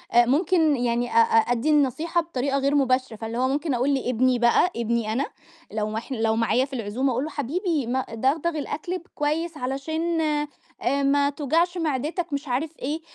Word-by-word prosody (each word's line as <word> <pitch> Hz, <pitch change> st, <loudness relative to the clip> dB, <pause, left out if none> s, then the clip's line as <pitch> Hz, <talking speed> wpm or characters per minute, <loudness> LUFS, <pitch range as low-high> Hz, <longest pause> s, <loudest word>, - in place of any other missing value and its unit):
ممكن 300 Hz, +6 st, +4 dB
يعني 240 Hz, -1 st, 0 dB
أ -, -, -6 dB
أ 225 Hz, 0 st, +4 dB
أدّي 245 Hz, +5 st, +1 dB
النصيحة 305 Hz, +4 st, +2 dB
بطريقة 275 Hz, -4 st, -2 dB
غير 280 Hz, +1 st, +1 dB
مباشرة 255 Hz, -4 st, +1 dB
فاللي 225 Hz, +1 st, -5 dB
هو 255 Hz, -, +2 dB
ممكن 285 Hz, +2 st, -1 dB
أقول 260 Hz, +4 st, +1 dB
لابني 255 Hz, -1 st, +1 dB
بقى 240 Hz, +9 st, +4 dB
ابني 235 Hz, -1 st, -1 dB
أنا، 270 Hz, +5 st, 0 dB, 0.5 s
لو 215 Hz, 0 st, -2 dB
ما 220 Hz, +1 st, -2 dB
ح 255 Hz, -, -13 dB
لو 225 Hz, -3 st, +1 dB
معايا 235 Hz, +3 st, +2 dB
في 275 Hz, -, -15 dB
العزومة 245 Hz, +3 st, -1 dB
أقول 255 Hz, +3 st, -1 dB
له 310 Hz, -, -4 dB
حبيبي 300 Hz, -, -2 dB
ما 260 Hz, +1 st, -1 dB
دغدغ 275 Hz, +8 st, +1 dB
الأكل 320 Hz, +5 st, -3 dB
ب -, -, -12 dB
كويس 310 Hz, +2 st, -1 dB
علشان 315 Hz, +6 st, -2 dB
آآ، 295 Hz, -2 st, -2 dB
ما 280 Hz, +1 st, +3 dB
توجعش 325 Hz, +5 st, 0 dB
معدتك 315 Hz, +2 st, -2 dB
مش 285 Hz, +1 st, -3 dB
عارف 295 Hz, +6 st, -2 dB
إيه، 300 Hz, +5 st, -3 dB
275 Hz, 185 wpm, -24 LUFS, 245-310 Hz, 0.5 s, ممكن